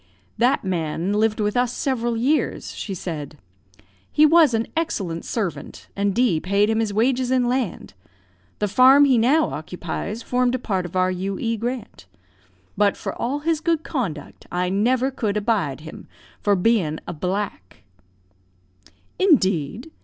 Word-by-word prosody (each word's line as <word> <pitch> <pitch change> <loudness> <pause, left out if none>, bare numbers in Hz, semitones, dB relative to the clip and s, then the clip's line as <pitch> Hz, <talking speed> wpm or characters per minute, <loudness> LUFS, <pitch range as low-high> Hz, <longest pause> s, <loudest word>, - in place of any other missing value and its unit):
"That 245 +3 +3
man 175 0 -2
lived 215 +1 +1
with 210 -1 0
us 245 -1 +2
several 240 -3 -1
years," 275 +7 0
she 195 - -5
said; 155 -4 -6 0.7
"he 305 - +5
was 310 -5 +5
an 225 +1 0
excellent 195 - -2
servant, 205 -7 -4
and 200 -1 0
D 235 -9 +2
paid 200 +5 +1
him 220 - +1
his 220 -2 0
wages 245 +4 +1
in 255 -1 +2
land. 245 -7 -2 0.6
The 210 - 0
farm 260 +7 +6
he 260 -4 +4
now 285 +8 +3
occupies 180 +7 -5
formed 250 0 +1
a - - 0
part 190 -7 -2
of 175 - -13
our 185 0 +2
U.E. 195 +5 -2
grant. 230 - -5 0.7
But, 205 0 +2
for - - -4
all 275 +5 -3
his 320 0 0
good 330 -2 0
conduct, 170 - -5
I 180 0 0
never 245 +7 +1
could 215 -5 -2
abide 200 - -1
him, 155 0 -11 0.3
for 205 -1 +2
being 180 -6 +1
a - - -4
black." 180 - -4 1.4
"Indeed! 215 - +2
215 Hz, 150 wpm, -22 LUFS, 185-255 Hz, 1.4 s, farm